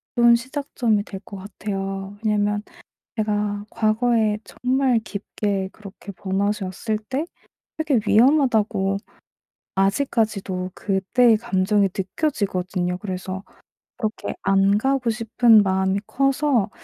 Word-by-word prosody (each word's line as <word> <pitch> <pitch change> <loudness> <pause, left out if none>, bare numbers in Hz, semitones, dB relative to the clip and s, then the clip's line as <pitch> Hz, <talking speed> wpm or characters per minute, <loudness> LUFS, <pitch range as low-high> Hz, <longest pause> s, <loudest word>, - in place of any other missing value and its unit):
좋은 235 -1 +6
시작점이 240 -4 -1
될 195 -2 -8
것 200 0 -10
같아요. 195 0 -5
왜냐하면 210 -1 +1 0.5
내가 210 -1 -1
과거에 220 -1 +2
정말 255 -1 +1
깊게 200 -2 -3
그렇게 200 -1 -11
번아웃이 200 +2 -1
왔을 210 +4 -3
때 260 +8 -3 0.5
되게 300 -7 +2
위험하다고 220 -6 +3 0.8
아직까지도 195 -3 0
그 195 -2 -1
때의 240 -3 +6
감정이 200 -2 +2
느껴지거든요. 185 - -1
그래서 185 -1 -5 0.6
그렇게 215 -2 -3
안 195 +1 +3
가고 265 0 +1
싶은 225 0 +4
마음이 190 0 +1
커서 275 -5 +1
210 Hz, 265 characters per minute, -23 LUFS, 195-235 Hz, 0.8 s, 좋은